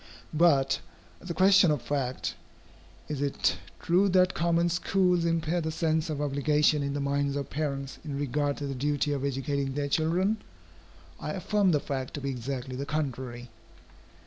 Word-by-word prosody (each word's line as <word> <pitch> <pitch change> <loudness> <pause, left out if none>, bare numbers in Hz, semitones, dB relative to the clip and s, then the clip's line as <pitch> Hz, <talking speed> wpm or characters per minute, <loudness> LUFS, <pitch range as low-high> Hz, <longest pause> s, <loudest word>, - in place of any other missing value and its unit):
But, 150 -4 +3 0.4
as 180 - -10
a 170 - -3
question 190 -1 +6
of 150 -2 +2
fact, 130 -1 -2 0.7
is 145 -2 -3
it 140 -1 +1 0.2
true 185 +4 +3
that 185 0 +4
common 170 +1 +2
schools 180 0 +2
impair 165 +1 0
the 160 - -2
sense 160 0 0
of 150 -2 -3
obligation 150 +1 +2
in 140 0 -2
the - - -1
minds 140 0 0
of 140 -1 -4
parents 140 -2 -3
in 145 -3 -4
regard 145 +1 -1
to 145 - -4
the 140 - -3
duty 145 +2 0
of 140 -1 -2
educating 140 0 -1
their 145 -1 -1
children? 175 +8 +1 0.8
I 150 - -4
affirm 200 +1 +1
the 155 -4 +3
fact 130 -2 -4
to - - -4
be 140 0 -2
exactly 130 0 -4
the 140 +2 -4
contrary. 130 -5 -4
145 Hz, 170 wpm, -28 LUFS, 140-165 Hz, 0.8 s, question